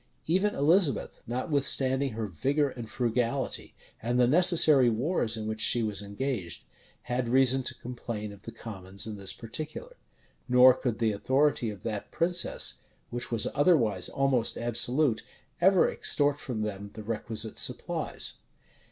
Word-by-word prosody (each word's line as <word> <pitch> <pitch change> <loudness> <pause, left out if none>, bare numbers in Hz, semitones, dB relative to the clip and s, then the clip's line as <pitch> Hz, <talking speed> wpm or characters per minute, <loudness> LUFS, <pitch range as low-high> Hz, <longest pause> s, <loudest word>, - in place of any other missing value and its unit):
Even 190 +5 +1
Elizabeth, 160 +1 +1
notwithstanding 135 0 0
her 110 0 -3
vigor 135 - -1
and 120 -3 -9
frugality, 120 +2 -2 0.3
and 120 +2 -1
the 125 - +5
necessary 155 -3 +5
wars 115 -1 0
in 110 - -5
which 110 0 -4
she 120 +1 +3
was 105 -2 -1
engaged, 100 - -5 0.4
had 125 -1 -2
reason 130 +1 +4
to 125 - -2
complain 115 -4 -6
of 100 - -15
the 115 - -9
commons 95 -4 -5
in 110 -1 -6
this 95 -1 -1
particular; 155 - -7 0.5
nor 125 +1 +7
could 125 -3 -3
the 115 -2 +1
authority 130 +3 +1
of 100 -3 -9
that 105 -3 -5
princess, 175 +1 +2 0.3
which 120 0 -4
was 115 -2 +1
otherwise 130 - +2
almost 135 -4 0
absolute, 120 +2 +1 0.4
ever 190 0 +5
extort 145 0 +2
from 115 -5 -4
them 100 -1 -5
the 110 - -8
requisite 110 0 -3
supplies. - - -1
120 Hz, 145 wpm, -28 LUFS, 110-140 Hz, 0.5 s, nor